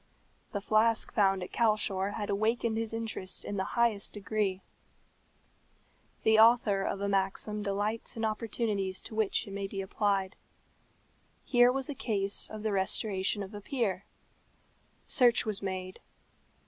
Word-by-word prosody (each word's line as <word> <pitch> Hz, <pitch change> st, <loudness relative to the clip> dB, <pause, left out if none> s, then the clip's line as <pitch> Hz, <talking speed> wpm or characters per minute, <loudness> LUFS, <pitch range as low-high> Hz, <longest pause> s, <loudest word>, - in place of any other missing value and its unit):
The 200 Hz, -, -3 dB
flask 220 Hz, +2 st, +2 dB
found 195 Hz, -3 st, +2 dB
at 180 Hz, -, -8 dB
Calshor 205 Hz, -3 st, +1 dB
had 205 Hz, -2 st, -3 dB
awakened 220 Hz, +2 st, 0 dB
his 225 Hz, 0 st, -2 dB
interest 225 Hz, -4 st, -2 dB
in 205 Hz, -, -4 dB
the 190 Hz, -, 0 dB
highest 230 Hz, -4 st, +1 dB
degree. 205 Hz, -2 st, -2 dB, 1.6 s
The 220 Hz, 0 st, +5 dB
author 220 Hz, -3 st, +5 dB
of 195 Hz, 0 st, -2 dB
a 200 Hz, -, 0 dB
maxim 195 Hz, +2 st, -1 dB
delights 205 Hz, +3 st, -2 dB
in 225 Hz, -, -1 dB
opportunities 215 Hz, -3 st, -2 dB
to -, -, -10 dB
which 215 Hz, -2 st, 0 dB
it 200 Hz, -, -10 dB
may 200 Hz, 0 st, -3 dB
be 195 Hz, 0 st, -6 dB
applied. 195 Hz, 0 st, 0 dB, 1.1 s
Here 245 Hz, 0 st, +5 dB
was 270 Hz, 0 st, -2 dB
a 290 Hz, -, -3 dB
case 200 Hz, -6 st, 0 dB
of 215 Hz, -1 st, -7 dB
the 215 Hz, -, 0 dB
restoration 195 Hz, +1 st, 0 dB
of 195 Hz, +2 st, -10 dB
a 205 Hz, -, -7 dB
peer. 200 Hz, -6 st, -2 dB, 1.0 s
Search 245 Hz, -3 st, +4 dB
was 215 Hz, -2 st, -2 dB
made. 185 Hz, -1 st, -5 dB
205 Hz, 145 wpm, -30 LUFS, 195-225 Hz, 1.6 s, The